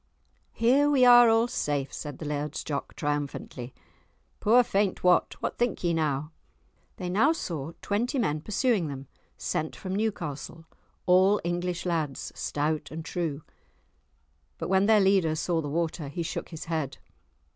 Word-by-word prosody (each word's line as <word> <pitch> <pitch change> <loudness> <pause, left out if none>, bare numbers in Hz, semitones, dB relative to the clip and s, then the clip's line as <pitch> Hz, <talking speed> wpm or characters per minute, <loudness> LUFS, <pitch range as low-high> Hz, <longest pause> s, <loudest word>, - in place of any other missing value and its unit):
"Here 270 +5 +4
we 270 -3 +5
are 240 -1 +8
all 225 +1 +4
safe," 145 - -2
said 145 -3 -6
the 160 - -7
Laird's 150 0 -3
Jock 140 -2 -4
triumphantly. 145 -4 -3 0.7
"Poor 240 +4 +5
faint 200 -3 0
Wat, 180 0 +3
what - - -3
think 240 -6 0
ye 170 -1 +2
now?" 150 -2 -1 0.7
They 180 - -4
now 220 - +3
saw 165 - -5
twenty 235 +7 -1
men 155 - 0
pursuing 215 - +1
them, 135 -1 -6 0.3
sent 155 0 -2
from 185 -1 -5
Newcastle, 165 -6 -3 0.4
all 190 +3 +5
English 175 +1 -2
lads, 160 -6 -2
stout 150 +1 -2
and 160 +1 -7
true. 160 -5 -3 1.1
But - - -4
when 190 +1 +3
their 220 -1 +6
leader 190 -5 +3
saw 165 +1 0
the 145 - -4
water 160 0 -2
he 155 +5 -4
shook 165 - -5
his 160 -2 -7
head. 160 -5 -3
170 Hz, 150 wpm, -27 LUFS, 150-205 Hz, 1.1 s, are